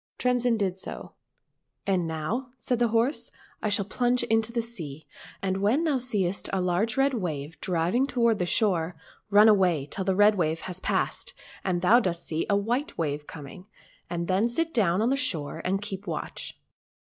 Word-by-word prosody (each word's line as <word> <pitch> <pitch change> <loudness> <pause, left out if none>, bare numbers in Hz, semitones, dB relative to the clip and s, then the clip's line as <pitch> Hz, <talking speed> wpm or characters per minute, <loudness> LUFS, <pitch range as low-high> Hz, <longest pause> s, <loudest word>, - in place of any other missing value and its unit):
Tremsin 245 -2 +2
did 190 -3 -1
so. - - -7 0.4
" - - -53
And 185 -4 +1
now," 165 - -3
said 245 0 -1
the 240 - +4
horse, 230 +6 +1 0.2
" - - -30
I 215 - 0
shall 205 -1 +2
plunge 245 +4 +1
into 225 -1 +1
the 235 -1 -1
sea, 160 -11 -8 0.4
and 190 -1 0
when 235 +11 +3
thou 295 -5 +1
seest 200 -7 -1
a 195 - 0
large 185 +6 0
red 270 0 +3
wave 160 - -4
driving 180 +9 +1
toward 235 -5 +2
the 180 - 0
shore, 180 -6 +2 0.3
run 210 +1 +7
away 185 -9 +4
till 190 +7 -4
the 190 0 +1
red 205 +2 +6
wave 160 -4 0
has 185 -1 -5
passed - - -1 0.3
and 180 -2 -1
thou 230 +7 +7
dost 175 -6 -2
see 160 0 -2
a 200 - +4
white 245 +10 -1
wave 150 -2 -2
coming, 160 +5 -10 0.4
and 170 0 -3
then 195 +5 +2
sit 330 +7 -1
down 200 -3 +2
on 235 - +2
the - - +3
shore 175 - -1
and 195 +2 0
keep 195 -1 -6
watch. - - -5
200 Hz, 190 wpm, -27 LUFS, 175-235 Hz, 0.4 s, run